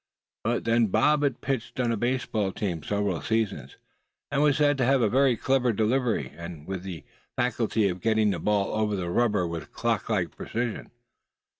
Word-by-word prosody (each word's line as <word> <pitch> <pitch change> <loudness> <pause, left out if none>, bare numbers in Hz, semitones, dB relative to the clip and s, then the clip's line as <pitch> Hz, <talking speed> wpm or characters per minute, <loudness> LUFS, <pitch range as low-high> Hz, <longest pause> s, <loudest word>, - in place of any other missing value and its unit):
But 120 +2 0
then 115 0 +3
Bob 150 +9 +3
had 140 -4 0
pitched 130 -2 -3
on 120 -2 +1
a - - +1
baseball 115 -3 -1
team 90 -5 -3
several 100 +2 -1
seasons, 100 - -2 0.5
and 140 0 +1
was 145 -2 +4
said 145 -1 +4
to - - +3
have 135 +2 +4
a - - +4
very 130 0 +3
clever 130 -1 +2
delivery, 115 +2 0 0.3
with 95 0 -4
the 90 -4 -7 0.3
faculty 115 -3 +1
of 90 -1 -3
getting 110 -1 +2
the - - -2
ball 105 -2 0
over 110 -1 0
the 90 -3 -3
rubber 105 -3 +2
with 85 -3 -6
clock - - -1
like - - -1
precision. 120 -1 -4
110 Hz, 175 wpm, -27 LUFS, 100-125 Hz, 0.5 s, was